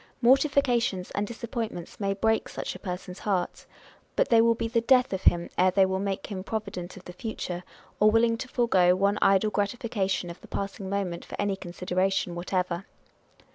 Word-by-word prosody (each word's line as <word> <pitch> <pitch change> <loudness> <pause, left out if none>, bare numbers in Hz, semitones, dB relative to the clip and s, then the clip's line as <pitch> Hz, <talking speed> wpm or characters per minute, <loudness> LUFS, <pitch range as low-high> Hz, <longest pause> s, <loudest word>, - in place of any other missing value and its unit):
Mortifications 245 -7 +3
and 205 +1 -1
disappointments 225 -6 -5
may 195 -1 0
break 220 +2 +1
such - - -4
a - - -10
person's 180 -1 -6
heart; 190 -4 -2 0.5
but - - +2
they 230 -1 +6
will 230 0 +4
be 225 - -2
the 230 0 +1
death 250 -1 +4
of 190 - -2
him 170 0 +4
ere 185 +1 +6
they 190 +1 +4
will 190 0 -1
make 195 -1 -2
him 190 -2 -4
provident 200 -5 -5
of 185 - -13
the 180 - -8
future, 180 -3 -5 0.4
or 210 - +6
willing 230 +1 +3
to 240 - -6
forego 190 -8 +3
one 200 +2 +1
idle 195 +2 +4
gratification 200 -3 -1
of 170 - -12
the - - -13
passing 195 -1 -4
moment 190 -4 -2
for - - -9
any 205 -1 +1
consideration 185 0 -1
whatever. 180 +1 -2
195 Hz, 180 wpm, -27 LUFS, 185-225 Hz, 0.5 s, they